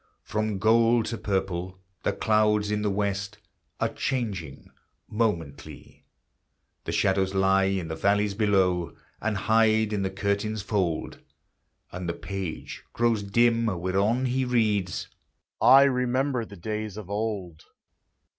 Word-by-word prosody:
From 110 -1 -2
gold 115 +2 +3
to 115 - -3
purple 95 -2 -2 0.2
the - - 0
clouds 105 0 +2
in 105 0 0
the 105 - 0
west 100 +1 -2 0.4
Are - - +2
changing 100 - -4 0.4
momently; 85 -10 -4 0.8
The - - -3
shadows 95 0 +1
lie 95 0 +3
in 95 -3 -1
the 80 - -4
valleys 100 +3 +1
below, 95 -5 +1 0.3
And 105 -1 -1
hide 110 +1 +3
in 100 - 0
the 95 - -1
curtain's 100 +2 -2
fold; 95 -6 -2 0.7
And 90 -1 -5
the 85 - -2
page 95 -5 -6
grows 115 -2 +1
dim 115 +3 +2
whereon 100 +6 0
he 130 +1 0
reads, 105 -8 0 0.5
"I 135 +1 +8
remember 125 -1 +1
the 100 -2 -12
days 105 +2 -4
of 105 -4 -7
old." 100 -5 -4
105 Hz, 125 wpm, -26 LUFS, 95-110 Hz, 0.8 s, I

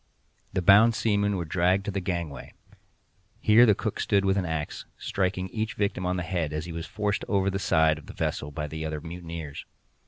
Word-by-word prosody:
The 95 - -1
bound 105 +5 +7
seamen 105 -2 +1
were 85 - -3
dragged 90 +4 +1
to 105 - -2
the 100 - -2
gangway. 85 -6 -4 0.9
Here 115 +3 +6
the 105 - +5
cook - - -3
stood 100 -1 +2
with 95 0 +3
an 95 -2 0
axe, 80 -2 -4
striking 95 -1 -1
each 110 +1 -3
victim 100 -3 -1
on 90 0 0
the 90 - -2
head 85 -4 -2
as 75 +1 -3
he 85 - -7
was 85 0 -5
forced 105 -2 -1
over 100 -1 +1
the 95 - -2
side 80 -4 +3
of 75 - -16
the - - -9
vessel 70 - -2
by 75 +1 -4
the 80 +1 -5
other 80 -1 -3
mutineers. 85 -2 -7
90 Hz, 210 wpm, -27 LUFS, 80-100 Hz, 0.9 s, bound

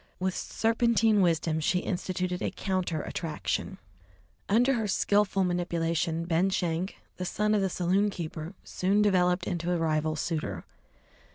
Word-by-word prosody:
With 185 0 -1
serpentine 225 -2 +2
wisdom 165 -2 +1
she 160 +4 +1
instituted 180 0 -2
a - - 0
counter 185 -5 -2
attraction. 165 +3 -3 0.7
Under 245 +6 +4
her 225 -4 -1
skilful 200 0 +2
manipulation, 170 -2 -1
Ben 170 +3 +2
Schenk, 180 0 -1 0.2
the 185 - -3
son 210 +4 0
of 210 - +3
the 190 - +1
saloon 185 +4 +1
keeper, 165 -1 -6
soon 200 +3 +1
developed 180 -2 +2
into 175 0 -2
a 175 - +2
rival 155 -1 0
suitor. 150 - -3
180 Hz, 135 wpm, -28 LUFS, 165-200 Hz, 0.7 s, Under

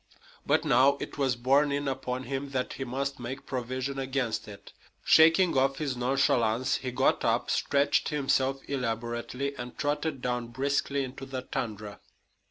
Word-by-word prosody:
But - - +2
now 135 +3 +4
it - - -7
was 135 -3 +2
borne 135 +4 +3
in 140 0 -1
upon 130 -1 -3
him 135 +2 -4
that 130 -2 -2
he 135 - -5
must 135 +2 -3
make 130 +3 -6
provision 130 +2 -3
against 130 -5 -2
it. 100 -1 -12 0.3
Shaking 165 +2 +5
off 135 +1 +2
his 140 -4 -2
nonchalance, 125 -2 +1
he 130 - -4
got 125 - +1
up, - - +1
stretched 140 +1 +2
himself 135 -2 +1
elaborately, 125 +1 -3
and 120 0 -7
trotted 145 0 -1
down 125 -1 -1
briskly 140 +3 -1
into 130 +1 -7
the 130 -1 -5
tundra. 105 -4 -5
130 Hz, 155 wpm, -28 LUFS, 125-140 Hz, 0.3 s, Shaking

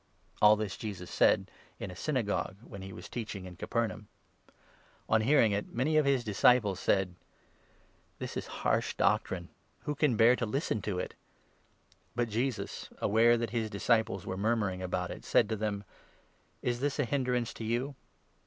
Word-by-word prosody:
All 105 0 +8
this 105 -2 -3
Jesus 95 -5 -6
said - - +3 0.3
in 95 - -5
a - - -9
Synagogue, 110 - -1
when 100 -5 -9
he 95 0 -7
was - - -9
teaching 105 -5 -5
in 90 -1 -9
Capernaum. 110 +2 -2 1.0
On 110 0 +3
hearing 120 -2 +4
it, 100 +1 -2
many 140 +6 +1
of 155 -1 +4
his 135 -3 +3
disciples 105 -2 +3
said: 95 -2 +1 0.5
" - - -35
This - - -6
is - - -4 0.2
harsh - - +1
doctrine! - - +1 0.3
Who 150 - -2
can 145 -5 +2
bear 115 +3 +6
to 115 - -1
listen 110 -2 -1
to 95 -1 -2
it? - - -3 0.5
" - - -36
But 120 -1 0
Jesus, 120 +3 -2
aware 115 +3 +4
that 115 0 -2
his 115 -2 -1
disciples 110 -2 +1
were 95 - -4
murmuring 100 -3 0
about 90 -1 -2
it, - - -8
said 115 - +3
to 110 - 0
them: 105 -1 -2 0.4
" - - -37
Is 120 -1 0
this 140 +1 -1
a 145 - +1
hindrance 125 -3 0
to - - -7
you? 120 +5 -1
110 Hz, 175 wpm, -31 LUFS, 100-125 Hz, 1.0 s, All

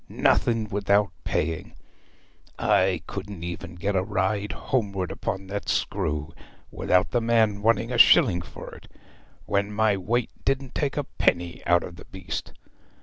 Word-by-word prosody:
Nothing 115 -2 +2
without 100 -1 +2
paying! 80 +1 -2 0.8
I 95 -3 +2
couldn't 100 -2 -7
even 85 0 -6
get 100 +3 -2
a 95 - +3
ride 100 +1 -1
homeward 100 - -2
upon 95 0 -4
that 100 +2 -5
screw 75 +1 -1 0.4
without 90 0 +1
the 120 - +1
man 110 -3 +2
wanting 115 +2 +2
a 120 - 0
shilling 90 -6 +6
for 85 - -10
it, - - -14 0.5
when 100 +1 0
my 105 0 +2
weight 115 +6 -1
didn't 135 -1 -1
take 145 -1 -1
a 145 - +1
penny 85 -2 -1
out 85 0 +4
of 85 - -9
the - - -12
beast. 95 -2 -6
100 Hz, 145 wpm, -25 LUFS, 90-110 Hz, 0.8 s, shilling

